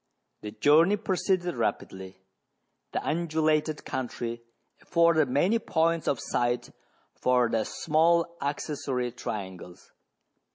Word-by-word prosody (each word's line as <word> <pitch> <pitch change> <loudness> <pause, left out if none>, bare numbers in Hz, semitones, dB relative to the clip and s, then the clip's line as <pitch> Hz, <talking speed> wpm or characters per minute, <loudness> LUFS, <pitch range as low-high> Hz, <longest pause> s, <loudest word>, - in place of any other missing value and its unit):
The 105 - -6
journey 150 - +4
proceeded 185 -4 -1
rapidly. 95 -5 -3 0.7
The - - -3
undulated 155 -1 0
country 120 -2 -4 0.4
afforded 170 -4 +3
many 175 - +2
points 165 -4 0
of 135 - +1
sight 120 0 -1 0.4
for 125 -1 +2
the 115 -1 0
small 170 +2 +1
accessory 140 -3 -2
trian 100 -6 -6
gles. 90 0 -14
150 Hz, 100 wpm, -27 LUFS, 120-170 Hz, 0.7 s, journey